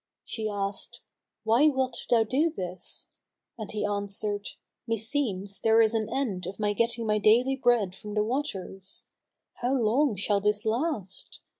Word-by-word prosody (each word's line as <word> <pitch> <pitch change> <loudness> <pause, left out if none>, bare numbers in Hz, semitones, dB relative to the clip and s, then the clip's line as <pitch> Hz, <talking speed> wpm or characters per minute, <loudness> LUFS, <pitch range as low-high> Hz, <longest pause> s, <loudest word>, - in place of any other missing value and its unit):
She 220 -1 -3
asked, 200 -1 -3 0.4
"Why 230 +7 +5
wilt 260 -4 -1
thou 230 -2 +5
do 275 +9 +2
this?"; 185 - -6 0.5
and 215 -3 -7
he 210 -1 -2
answered, 205 0 -2 0.4
"Meseems 220 -4 -1
there 225 0 +5
is 225 0 +5
an 220 -1 0
end 200 -10 -2
of 195 - -7
my 205 -1 +1
getting 230 +2 +1
my 210 -1 +2
daily 240 +6 +4
bread 240 -8 +2
from 210 +1 -8
the 210 - +3
waters. 205 -7 -3 0.5
How 250 +2 0
long 245 +2 +2
shall 200 +1 +1
this 210 +2 +1
last? 220 - -2
220 Hz, 150 wpm, -28 LUFS, 205-245 Hz, 0.5 s, Why